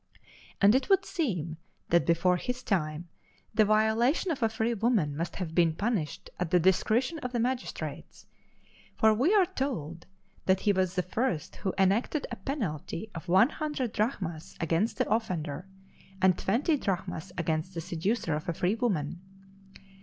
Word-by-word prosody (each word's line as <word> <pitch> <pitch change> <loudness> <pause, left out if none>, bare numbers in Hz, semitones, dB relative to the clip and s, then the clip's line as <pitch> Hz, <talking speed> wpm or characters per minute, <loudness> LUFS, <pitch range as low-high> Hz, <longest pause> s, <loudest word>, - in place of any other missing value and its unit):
And 200 +1 +6
it 260 +1 +1
would 390 0 +4
seem 180 - -2 0.3
that 170 0 +3
before 170 +2 +3
his 250 +6 -4
time 160 -3 -1 0.5
the 215 -1 +4
violation 220 - +2
of 275 - -3
a 225 - +3
free 225 +1 0
woman 215 - +1
must 165 +2 -3
have 175 -4 -4
been 165 -2 +3
punished 205 -6 -2
at 180 -3 -1
the 180 0 +4
discretion 220 - +2
of 250 -3 -5
the 240 - 0
magistrates; 250 +2 -4 0.7
for 220 0 +5
we 260 - +2
are 390 -3 +6
told 170 - -4 0.4
that 190 0 +3
he 205 - +3
was 185 -1 0
the 180 - +1
first 180 - -2
who 190 - -1
enacted 205 +10 +2
a - - -2
penalty 205 - -4
of 165 +2 -8
one 190 +9 +5
hundred 295 -7 -3
drachmas 185 - -2
against 165 +7 0
the - - +1
offender, 180 -7 -2 0.5
and 185 -1 +4
twenty 260 - +1
drachmas 190 - -3
against 165 +1 -1
the - - -2
seducer 175 +2 -1
of 155 +3 -3
a - - 0
free 180 +4 +1
woman. 180 - -1
195 Hz, 160 wpm, -29 LUFS, 170-240 Hz, 0.7 s, And